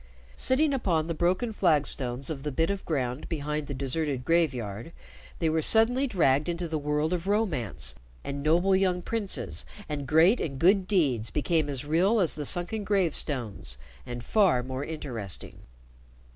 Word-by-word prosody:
Sitting 285 Hz, +3 st, +2 dB
upon 175 Hz, -, +1 dB
the 165 Hz, -, -2 dB
broken 180 Hz, +8 st, 0 dB
flagstones 140 Hz, -7 st, 0 dB
of 140 Hz, -3 st, -5 dB
the 150 Hz, +1 st, -3 dB
bit 165 Hz, +7 st, +1 dB
of 200 Hz, -1 st, -4 dB
ground 130 Hz, -3 st, -2 dB
behind 150 Hz, -2 st, -3 dB
the 140 Hz, -, -4 dB
deserted 135 Hz, -1 st, -1 dB
graveyard, 130 Hz, -6 st, 0 dB, 0.4 s
they 165 Hz, -, 0 dB
were 160 Hz, 0 st, +1 dB
suddenly 240 Hz, -, +4 dB
dragged 150 Hz, -, +2 dB
into 170 Hz, 0 st, -2 dB
the 160 Hz, -1 st, -2 dB
world 150 Hz, +3 st, 0 dB
of 175 Hz, +1 st, -3 dB
romance, 185 Hz, -, -1 dB, 0.3 s
and 140 Hz, 0 st, -4 dB
noble 175 Hz, +6 st, +3 dB
young 185 Hz, -2 st, +1 dB
princes 220 Hz, -4 st, -3 dB, 0.2 s
and 145 Hz, -3 st, -4 dB
great 165 Hz, +9 st, +5 dB
and 135 Hz, -4 st, -3 dB
good 185 Hz, +4 st, +4 dB
deeds 135 Hz, -, +1 dB
became 155 Hz, 0 st, 0 dB
as 140 Hz, -1 st, -3 dB
real 180 Hz, +9 st, +3 dB
as 175 Hz, -6 st, +2 dB
the 145 Hz, -2 st, -3 dB
sunken 180 Hz, +5 st, 0 dB
gravestones, 135 Hz, -, -1 dB, 0.3 s
and 120 Hz, -1 st, -7 dB
far 185 Hz, -, +3 dB
more 130 Hz, +2 st, -4 dB
interesting. 125 Hz, -, -4 dB
160 Hz, 160 wpm, -27 LUFS, 135-185 Hz, 0.4 s, great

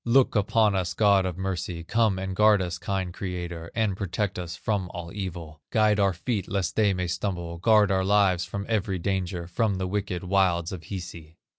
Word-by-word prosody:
Look 125 Hz, +2 st, +3 dB
upon 105 Hz, 0 st, +3 dB
us, 90 Hz, -2 st, -1 dB
God 100 Hz, -2 st, +4 dB
of 90 Hz, -2 st, -5 dB
mercy, 90 Hz, -3 st, -3 dB
Come 110 Hz, +2 st, +2 dB
and 95 Hz, 0 st, -4 dB
guard 105 Hz, 0 st, +5 dB
us, 90 Hz, -1 st, -3 dB
kind 95 Hz, -2 st, -2 dB
Creator, 85 Hz, -3 st, -5 dB
And 110 Hz, -4 st, +1 dB
protect 95 Hz, 0 st, -2 dB
us 90 Hz, -1 st, -5 dB
from 95 Hz, -1 st, -2 dB
all 85 Hz, -1 st, -6 dB
evil! 85 Hz, -6 st, -6 dB
Guide 105 Hz, -1 st, +3 dB
our 100 Hz, -1 st, +4 dB
feet 95 Hz, +4 st, -3 dB
lest 95 Hz, -4 st, -1 dB
they 105 Hz, -2 st, +3 dB
may 90 Hz, -1 st, -1 dB
stumble, 85 Hz, -1 st, -3 dB
Guard 105 Hz, 0 st, +4 dB
our 95 Hz, 0 st, +2 dB
lives 95 Hz, -3 st, +3 dB
from 100 Hz, +2 st, -5 dB
every 100 Hz, -4 st, 0 dB
danger, 90 Hz, -1 st, -2 dB
From 100 Hz, +4 st, 0 dB
the 95 Hz, 0 st, -2 dB
wicked 95 Hz, -2 st, -2 dB
wilds 90 Hz, -2 st, +1 dB
of 90 Hz, -3 st, -7 dB
Hisi." 85 Hz, -4 st, -8 dB
95 Hz, 190 wpm, -26 LUFS, 90-100 Hz, -, guard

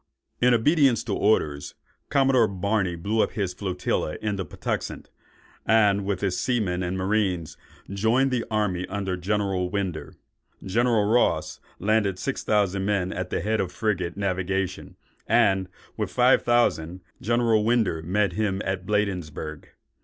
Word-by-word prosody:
In 125 Hz, +1 st, +5 dB
obedience 135 Hz, +1 st, +3 dB
to 110 Hz, -, -3 dB
orders, 75 Hz, -9 st, 0 dB, 0.3 s
Commodore 135 Hz, -4 st, +4 dB
Barney 100 Hz, -1 st, -1 dB
blew 105 Hz, +6 st, 0 dB
up -, -, 0 dB
his 95 Hz, -4 st, -2 dB
flotilla 90 Hz, -5 st, -2 dB
in 105 Hz, -2 st, -2 dB
the 95 Hz, -, -3 dB
Patuxent, -, -, -5 dB, 0.5 s
and 100 Hz, -3 st, +3 dB
with 100 Hz, -2 st, -2 dB
his 95 Hz, -3 st, 0 dB
seamen 105 Hz, -8 st, 0 dB
and 90 Hz, +1 st, -2 dB
marines, 95 Hz, -4 st, -1 dB, 0.3 s
joined 115 Hz, +7 st, +1 dB
the 125 Hz, -2 st, 0 dB
army 100 Hz, -5 st, -1 dB
under 95 Hz, -1 st, -3 dB
General 95 Hz, -1 st, -1 dB
Winder. 95 Hz, -5 st, -4 dB, 0.5 s
General 115 Hz, +2 st, +2 dB
Ross 85 Hz, -9 st, +1 dB, 0.2 s
landed 100 Hz, -2 st, +1 dB
six 135 Hz, +7 st, -3 dB
thousand 100 Hz, -2 st, +1 dB
men 95 Hz, -2 st, 0 dB
at 90 Hz, 0 st, -4 dB
the -, -, -2 dB
head 110 Hz, +1 st, 0 dB
of 90 Hz, -2 st, -3 dB
frigate 95 Hz, -5 st, -2 dB
navigation, 95 Hz, -1 st, -2 dB, 0.3 s
and, 95 Hz, -5 st, +3 dB, 0.3 s
with -, -, -2 dB
five -, -, +4 dB
thousand, 90 Hz, -8 st, +1 dB, 0.2 s
General 115 Hz, -1 st, +2 dB
Winder 110 Hz, -8 st, +1 dB
met 95 Hz, +5 st, 0 dB
him 105 Hz, -3 st, -1 dB
at 95 Hz, -1 st, -3 dB
Bladensburg. 90 Hz, -7 st, -2 dB
100 Hz, 140 wpm, -25 LUFS, 90-110 Hz, 0.5 s, In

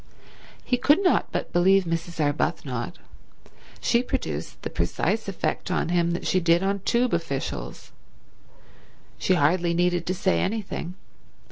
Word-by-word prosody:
He 250 Hz, -, +1 dB
could 295 Hz, +9 st, +4 dB
not 360 Hz, -, +2 dB
but -, -, -3 dB
believe 190 Hz, +2 st, +5 dB
Mrs. 165 Hz, 0 st, -4 dB
Arbuthnot. 145 Hz, -4 st, -1 dB, 0.8 s
She 235 Hz, -, +2 dB
produced 250 Hz, -, -4 dB
the -, -, -4 dB
precise 220 Hz, 0 st, -1 dB
effect 195 Hz, -1 st, -2 dB
on 180 Hz, -, 0 dB
him 170 Hz, -1 st, +2 dB
that 175 Hz, -, -4 dB
she 185 Hz, -, +2 dB
did 170 Hz, +1 st, +3 dB
on 200 Hz, +1 st, 0 dB
Tube 235 Hz, +5 st, +1 dB
officials. 140 Hz, -, -4 dB, 1.3 s
She 185 Hz, -, +2 dB
hardly 170 Hz, +2 st, +2 dB
needed 175 Hz, -1 st, +1 dB
to 185 Hz, -, 0 dB
say 190 Hz, 0 st, +1 dB
anything. 190 Hz, -3 st, -3 dB
175 Hz, 135 wpm, -25 LUFS, 165-195 Hz, 1.3 s, believe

